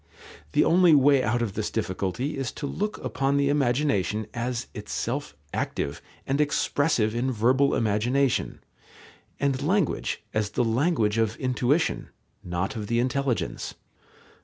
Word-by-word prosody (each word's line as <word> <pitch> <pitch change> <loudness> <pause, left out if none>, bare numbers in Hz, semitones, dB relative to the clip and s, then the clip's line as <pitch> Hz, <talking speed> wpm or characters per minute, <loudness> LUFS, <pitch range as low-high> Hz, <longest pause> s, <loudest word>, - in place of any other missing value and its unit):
The - - +5
only 175 -2 +6
way 140 -1 +5
out 120 0 +1
of 105 -4 -3
this - - -2
difficulty 95 - -2
is 135 -3 -3
to 145 - -5
look 210 +8 -2
upon 135 +1 0
the 140 0 +2
imagination 120 -7 +1
as 120 0 -2
itself 70 - -4 0.2
active 70 - -2 0.2
and 140 +2 +1
expressive 145 -5 +1
in 125 +3 0
verbal 130 +5 +3
imagination, 120 +5 +1 0.8
and 135 -2 0
language 180 - 0
as 110 -1 0
the - - +4
language 115 -2 +1
of 110 0 +1
intuition, 130 +5 0 0.3
not 90 +7 -2
of 105 -2 -4
the 115 - 0
intelligence. 130 -1 -1
125 Hz, 135 wpm, -26 LUFS, 110-140 Hz, 0.8 s, only